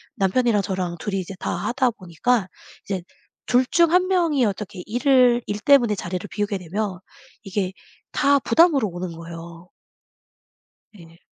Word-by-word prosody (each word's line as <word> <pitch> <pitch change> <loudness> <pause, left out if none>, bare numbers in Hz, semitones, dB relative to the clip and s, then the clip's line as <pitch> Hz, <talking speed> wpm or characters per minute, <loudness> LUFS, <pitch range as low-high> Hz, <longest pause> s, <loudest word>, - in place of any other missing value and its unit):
남편이랑 210 +2 +2
저랑 185 -3 -3
둘이 195 +1 -2
이제 190 +1 -6
다 - - -3
하다 255 0 0
보니까 190 +3 -1 0.4
이제 190 -2 -3 0.5
둘 250 +1 +3
중 335 +5 +3
1 365 +1 +4
명이 335 -8 +2
어떻게 200 -3 -4
일을 245 +1 +3
일 205 0 -3
때문에 240 -3 +4
자리를 180 0 -5
비우게 205 -1 -2
되면 190 +1 -4 0.4
이게 195 -1 -2 0.4
다 280 0 +3
부담으로 295 -6 +3
오는 175 0 -5
거예요. 170 +1 -10 1.2
네. 165 -4 -16
205 Hz, 275 characters per minute, -23 LUFS, 185-250 Hz, 1.2 s, 1